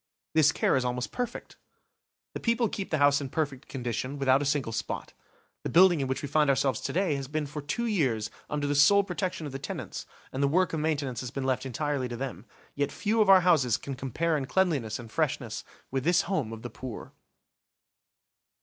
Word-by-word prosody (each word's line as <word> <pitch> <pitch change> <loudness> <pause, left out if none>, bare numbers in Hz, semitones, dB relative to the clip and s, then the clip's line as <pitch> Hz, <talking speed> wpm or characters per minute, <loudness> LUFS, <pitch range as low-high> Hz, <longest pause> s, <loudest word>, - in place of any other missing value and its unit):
This 155 -1 +5
care - - +2
is 130 - +2
almost 125 0 -2
perfect. 245 -1 -5 0.8
The - - -4
people 230 0 +2
keep 195 -1 -5
the 155 - +1
house 145 0 +4
in 135 - -4
perfect 140 -3 -3
condition, 125 +1 -3
without 135 0 +3
a - - -1
single 140 -5 0
spot. 110 - -4 0.5
The - - -3
building 175 -3 +6
in 135 - -1
which 130 +2 -2
we - - -2
find 150 +1 +3
ourselves 135 0 +2
to - - -3
day 185 -3 +1
has 135 -1 -5
been 150 +2 -2
for 150 +1 -6
two 235 - -2
years 130 - 0 0.2
under 150 -1 -1
the 145 - +1
sole 175 +8 +6
protection 180 -3 -3
of 145 - -5
the 135 - -5
tenants, 140 - -6 0.3
and 130 - -2
the 140 - +4
work 180 +5 +2
of 160 - 0
maintenance 145 -5 -1
has 125 - -4
been 135 +2 -4
left 130 0 0
entirely 140 +1 -1
to 120 -1 -6
them. 120 -5 -6 0.3
Yet 145 0 -1
few 220 +2 +1
of 210 - +3
our 190 -1 +9
houses 145 - +3
can 140 - -6
compare 135 +6 -1
in 140 -3 -1
cleanliness 145 - +1
and 115 -2 -10
freshness - - -1 0.3
with 135 -1 -1
this 175 +2 +3
home 155 - -1
of 115 0 -8
the 120 - -6
poor. 130 -4 -8
145 Hz, 215 wpm, -28 LUFS, 130-165 Hz, 0.8 s, our